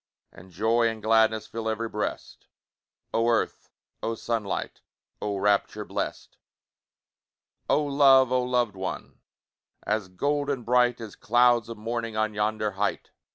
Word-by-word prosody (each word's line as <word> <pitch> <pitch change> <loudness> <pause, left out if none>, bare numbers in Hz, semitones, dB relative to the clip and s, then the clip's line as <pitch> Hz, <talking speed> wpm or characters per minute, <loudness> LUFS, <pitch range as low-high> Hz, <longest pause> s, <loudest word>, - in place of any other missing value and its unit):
And 90 +2 -15
joy 115 +6 +2
and 115 -1 -3
gladness 110 0 +3
Fill 110 -1 -4
ev'ry 115 +1 -2
breast! 105 -1 -5 0.7
Oh 115 +1 +2
earth! 115 - -1 0.3
oh 115 - -2
sunlight! 110 -3 -3 0.4
Oh 105 -1 -2
rapture 100 0 +1
blest! - - -5 1.3
Oh 150 - +3
love! 135 -3 +5
oh 130 0 +3
loved 125 -4 0
one! 95 -1 -6 0.7
As 105 -2 -1
golden 140 +6 -1
bright, 125 0 +3
As 110 -3 -8
clouds 120 0 +3
of 115 - -7
morning 115 0 -4
On 110 0 0
yonder 105 0 -1
height! 100 +2 -2
115 Hz, 130 wpm, -26 LUFS, 105-120 Hz, 1.3 s, love